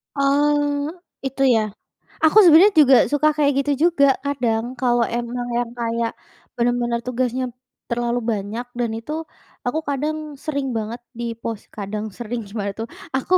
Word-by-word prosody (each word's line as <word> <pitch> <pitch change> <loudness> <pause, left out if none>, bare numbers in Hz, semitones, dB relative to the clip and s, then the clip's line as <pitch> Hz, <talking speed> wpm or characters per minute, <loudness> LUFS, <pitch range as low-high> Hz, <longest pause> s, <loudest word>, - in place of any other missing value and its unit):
Oh, 290 +1 +2 0.3
itu, 270 0 -3 0.2
ya? 215 -2 -1 0.5
Aku 315 - +4
sebenarnya 365 +3 +7
juga 270 -2 +7 0.2
suka 295 +1 +3
kayak 290 -1 +3
gitu 290 +1 -1 0.2
juga 300 -5 +3 0.2
kadang, 240 -6 0 0.2
kalau 240 -2 +2
emang 240 +1 -3
yang 240 -1 -1
kayak 230 -1 -1 0.5
benar-benar 240 0 +1
tugasnya 250 0 -1 0.5
terlalu 240 0 0
banyak, 215 +3 -3
dan 240 -1 +1
itu 230 +6 -7 0.5
aku 245 +6 0
kadang 295 +3 -1 0.3
sering 280 -3 -1
banget 220 +2 -3 0.2
di - - -3 0.2
pos 225 -3 -3 0.2
kadang, 210 +1 -4
sering, 240 0 -4
gimana 200 -1 -3
tuh. 225 +3 -5 0.3
Aku 265 +7 0
245 Hz, 145 wpm, -22 LUFS, 230-285 Hz, 0.5 s, sebenarnya